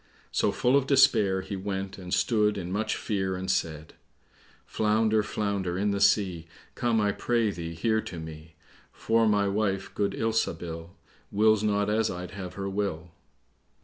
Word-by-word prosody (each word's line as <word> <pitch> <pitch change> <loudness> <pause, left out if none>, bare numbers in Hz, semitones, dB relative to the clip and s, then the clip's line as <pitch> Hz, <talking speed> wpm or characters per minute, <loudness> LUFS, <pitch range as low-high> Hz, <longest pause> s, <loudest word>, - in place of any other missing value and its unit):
So, - - +2
full 125 +2 +2
of 140 -1 +2
despair, 115 -9 +4
he 100 +1 -6
went 95 0 -4
and 90 -1 -8
stood 105 -1 +2
in 90 -2 -5
much 110 +3 -1
fear 95 -3 -2
and 95 +1 -2
said, 80 -4 -2 0.7
"Flounder, 110 0 +2
flounder 100 -4 -2
in 100 +2 +1
the 100 0 -1
sea, 90 -5 +2 0.3
Come, 120 -2 +1
I 105 -1 +2
pray 115 -1 0
thee, 85 -2 -6
here 110 +6 +1
to 85 - -7
me;" 80 0 -10 0.4
For 115 0 +1
my 105 -1 +2
wife, 100 -1 -1
good 100 -1 0
Ilsabil, 85 -7 -2 0.4
Wills 110 0 +4
not 105 -1 +1
as 110 +1 +1
I'd 90 +1 -6
have 95 -2 -7
her 100 -1 -4
will. 95 -4 -3
100 Hz, 160 wpm, -27 LUFS, 90-110 Hz, 0.7 s, despair